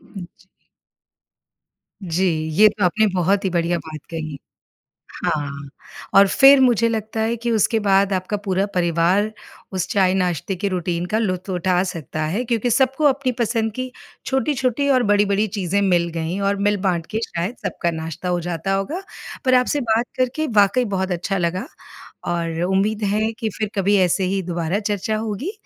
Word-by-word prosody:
जी। 190 Hz, -1 st, -12 dB, 1.6 s
जी, 180 Hz, +1 st, -1 dB, 0.3 s
ये 210 Hz, +7 st, +6 dB
तो 205 Hz, -2 st, -2 dB
आपने 215 Hz, +5 st, +3 dB
बहुत 190 Hz, +3 st, +1 dB
ही 190 Hz, -, +1 dB
बढ़िया 170 Hz, 0 st, 0 dB
बात 155 Hz, -1 st, -9 dB
कही, 155 Hz, -3 st, -5 dB, 0.9 s
हाँ, 140 Hz, -2 st, -2 dB, 0.5 s
और 200 Hz, 0 st, +8 dB
फिर 275 Hz, +6 st, +7 dB
मुझे 235 Hz, -3 st, +4 dB
लगता 220 Hz, 0 st, -3 dB
है 230 Hz, +1 st, 0 dB
कि 235 Hz, +1 st, -3 dB
उसके 225 Hz, 0 st, +2 dB
बाद 195 Hz, -1 st, +3 dB
आपका 185 Hz, +3 st, -2 dB
पूरा 190 Hz, +1 st, +1 dB
परिवार 180 Hz, +4 st, +2 dB, 0.4 s
उस 185 Hz, -2 st, -1 dB
चाय-नाश्ते 185 Hz, -2 st, +1 dB
के 200 Hz, +3 st, -2 dB
रुटीन 175 Hz, -1 st, -2 dB
का 215 Hz, +5 st, -1 dB
लुत्फ़ 185 Hz, -3 st, -2 dB
उठा 180 Hz, 0 st, +1 dB
सकता 160 Hz, -4 st, -5 dB
है 195 Hz, +11 st, -1 dB
क्योंकि 235 Hz, +1 st, 0 dB
सबको 270 Hz, +5 st, +2 dB
अपनी 270 Hz, -2 st, +2 dB
पसंद 225 Hz, -1 st, 0 dB
की 255 Hz, 0 st, -4 dB, 0.3 s
छोटी-छोटी 265 Hz, 0 st, 0 dB
और 255 Hz, -2 st, +4 dB
बड़ी-बड़ी 205 Hz, 0 st, +2 dB
चीज़ें 200 Hz, 0 st, -1 dB
मिल 175 Hz, -3 st, +2 dB
गईं 165 Hz, +3 st, -3 dB
और 200 Hz, 0 st, +1 dB
मिल-बाँट 185 Hz, -5 st, 0 dB
के 220 Hz, -, -1 dB
शायद 175 Hz, +8 st, -3 dB
सबका 170 Hz, -1 st, -1 dB
नाश्ता 160 Hz, +2 st, -5 dB
हो 175 Hz, -1 st, +1 dB
जाता 175 Hz, +2 st, -2 dB
होगा। 240 Hz, -, -2 dB, 0.4 s
पर 255 Hz, -, +3 dB
आपसे 255 Hz, +3 st, +2 dB
बात 230 Hz, 0 st, +1 dB
करके 260 Hz, +5 st, 0 dB
वाक़ई 245 Hz, +5 st, +2 dB
बहुत 190 Hz, 0 st, -1 dB
अच्छा 180 Hz, +3 st, -1 dB
लगा 180 Hz, -, -1 dB, 0.7 s
और 165 Hz, -1 st, -2 dB
उम्मीद 210 Hz, +3 st, +1 dB
है 220 Hz, +1 st, 0 dB
कि 225 Hz, -, -1 dB
फिर 215 Hz, -1 st, -2 dB
कभी 200 Hz, +1 st, +2 dB
ऐसे 185 Hz, +2 st, +1 dB
ही 195 Hz, -, -1 dB
दोबारा 175 Hz, +2 st, -2 dB
चर्चा 210 Hz, +1 st, -1 dB
होगी। 225 Hz, -, -3 dB
195 Hz, 165 wpm, -21 LUFS, 175-225 Hz, 1.6 s, और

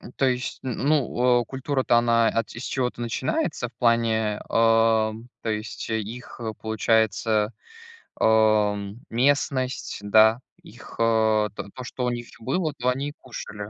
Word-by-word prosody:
М, 125 Hz, -, -12 dB
то 135 Hz, -, +1 dB
есть 125 Hz, 0 st, -2 dB
н 130 Hz, -3 st, -3 dB
ну, 125 Hz, -4 st, +2 dB
э, -, -, -9 dB
культура-то 130 Hz, -2 st, 0 dB
она 115 Hz, -1 st, +3 dB
ат 115 Hz, -1 st, -2 dB
и -, -, -7 dB
с -, -, -7 dB
чего-то 125 Hz, -2 st, -2 dB
начинается 120 Hz, -, -2 dB
в -, -, -23 dB
плане, 110 Hz, -3 st, +1 dB
а, 115 Hz, -1 st, +3 dB, 0.3 s
то 115 Hz, -, -4 dB
есть 105 Hz, -2 st, -4 dB
их, 110 Hz, +2 st, -5 dB, 0.2 s
получается, 110 Hz, 0 st, +1 dB, 0.7 s
ам, 105 Hz, -2 st, +2 dB
местность, 130 Hz, +1 st, 0 dB
да, 110 Hz, +3 st, +5 dB, 0.2 s
их, 115 Hz, +2 st, -13 dB
а, 110 Hz, -2 st, +3 dB
то -, -, -7 dB
то, 130 Hz, -, -8 dB
что 125 Hz, 0 st, -4 dB
у 125 Hz, -, +1 dB
них 120 Hz, 0 st, -5 dB
было, 150 Hz, +6 st, -1 dB
то 125 Hz, +1 st, 0 dB
они 135 Hz, +3 st, -1 dB
и -, -, -10 dB
кушали. 105 Hz, -4 st, -8 dB
115 Hz, 155 wpm, -24 LUFS, 110-125 Hz, 0.7 s, да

